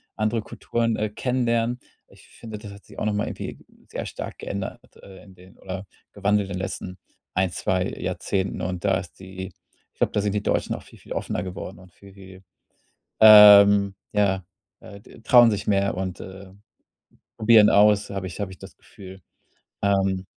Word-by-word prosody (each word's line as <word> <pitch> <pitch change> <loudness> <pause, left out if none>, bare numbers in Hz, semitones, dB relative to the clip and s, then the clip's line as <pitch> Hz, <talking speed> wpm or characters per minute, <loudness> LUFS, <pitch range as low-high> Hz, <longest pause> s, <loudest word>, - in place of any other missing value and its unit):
andere 110 +1 -1
Kulturen, 115 +1 -2
äh, 110 - -2
kennenlernen. 120 +1 -1 0.3
Ich - - -20
finde, 110 -2 -10
das 105 -1 -10
hat 100 0 -14
sich - - -12
auch - - -2
noch 105 - 0
mal 105 0 -1
irgendwie - - -7 0.3
sehr - - -6
stark - - -7
geändert, 100 -1 -6 0.2
äh, 95 -1 -14
in 95 -3 -16
den 90 +1 -18
oder 95 +1 -7 0.3
gewandelt 100 0 0
in - - -5
den - - -4
letzten 95 -1 -6 0.4
1, 95 0 +1
2 95 +1 -1
Jahrzehnten 95 0 -3
und 90 +1 -4
da 95 -1 +2
ist 90 -3 -12
die 95 0 -8 0.5
ich - - -41
glaube, - - +1
da 105 - +1
sind 100 0 -1
die 105 -1 -2
Deutschen - - -1
auch - - -10
viel, - - -18
viel - - -9
offener 90 - -3
geworden 90 0 -8
und 90 -1 -17
viel, 100 +2 -17
viel, 95 -1 -14 0.8
ähm, 100 -2 +8 0.2
ja, 95 -2 +1 0.4
äh, 100 - -12
d 105 - -17
trauen 120 -1 +6
sich 105 -1 -4
mehr 100 -1 +1
und, 95 -1 -5
äh, 95 0 -11 0.9
probieren 110 -1 +6
aus, 105 0 +4
habe 100 -1 -4
ich 90 - -9
habe 100 -2 -4
ich 95 - -13
das - - -13
Gefühl. 95 0 -14 0.6
Ähm. 95 -1 +1
100 Hz, 185 wpm, -23 LUFS, 95-105 Hz, 0.9 s, ähm